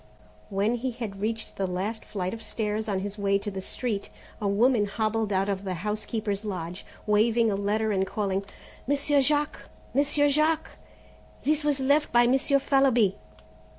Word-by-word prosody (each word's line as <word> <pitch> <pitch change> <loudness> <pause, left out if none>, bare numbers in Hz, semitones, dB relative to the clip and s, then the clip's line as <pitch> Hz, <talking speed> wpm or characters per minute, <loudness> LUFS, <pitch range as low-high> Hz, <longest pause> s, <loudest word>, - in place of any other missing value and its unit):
When 200 +4 +1
he 245 +2 -2
had 215 -5 -6
reached 225 +1 -3
the 195 - 0
last 195 +5 -3
flight 185 -3 -3
of 225 - -7
stairs 215 -1 -2
on 195 -3 -1
his 205 +1 -5
way 200 0 +2
to 205 +1 -5
the 190 -1 -5
street 210 0 -3 0.3
a 205 - 0
woman 215 +1 +3
hobbled 220 +1 -1
out 195 0 +1
of 200 -1 -2
the 185 -2 -3
house 210 +4 -3
keeper's 215 -2 -2
lodge 180 -3 -5 0.2
waving 220 +2 +3
a - - 0
letter 210 +2 0
and 190 -1 +1
calling: 195 -1 -1 0.4
"Monsieur 285 0 +3
Jack! 295 +2 +1 0.4
Monsieur 290 +2 +3
Jack! 310 +2 +2 0.7
this 305 +1 +1
was 290 -2 +1
left 285 +3 +2
by 240 0 +5
Monsieur 270 +3 +3
Fallowby!" 265 -8 +3
215 Hz, 170 wpm, -27 LUFS, 200-260 Hz, 0.7 s, by